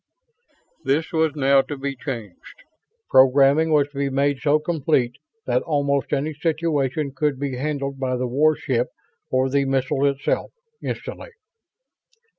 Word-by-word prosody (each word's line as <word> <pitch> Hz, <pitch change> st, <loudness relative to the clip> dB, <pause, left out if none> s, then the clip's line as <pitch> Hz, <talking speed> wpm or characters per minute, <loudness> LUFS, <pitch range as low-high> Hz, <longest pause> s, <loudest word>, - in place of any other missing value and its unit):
This 155 Hz, +4 st, 0 dB
was 160 Hz, -2 st, +2 dB
now 140 Hz, -1 st, +4 dB
to 145 Hz, +1 st, -7 dB
be 140 Hz, 0 st, -3 dB
changed. 120 Hz, -, -8 dB, 0.4 s
Programming 140 Hz, +4 st, +5 dB
was 145 Hz, -2 st, +4 dB
to 145 Hz, -, -13 dB
be 140 Hz, 0 st, 0 dB
made 140 Hz, 0 st, +1 dB
so 150 Hz, 0 st, +3 dB
complete 150 Hz, -6 st, 0 dB, 0.3 s
that -, -, +1 dB
almost 140 Hz, -3 st, 0 dB
any 150 Hz, +2 st, -1 dB
situation 150 Hz, -2 st, -1 dB
could 145 Hz, -1 st, 0 dB
be 140 Hz, -2 st, -2 dB
handled 140 Hz, 0 st, -3 dB
by 130 Hz, -1 st, -1 dB
the 125 Hz, -, -1 dB
warship 130 Hz, -2 st, +1 dB, 0.4 s
or 130 Hz, 0 st, +2 dB
the 140 Hz, +1 st, +1 dB
missile 135 Hz, +1 st, +1 dB
itself 140 Hz, 0 st, -1 dB, 0.3 s
instantly. -, -, -6 dB
140 Hz, 135 wpm, -22 LUFS, 135-150 Hz, 0.4 s, Programming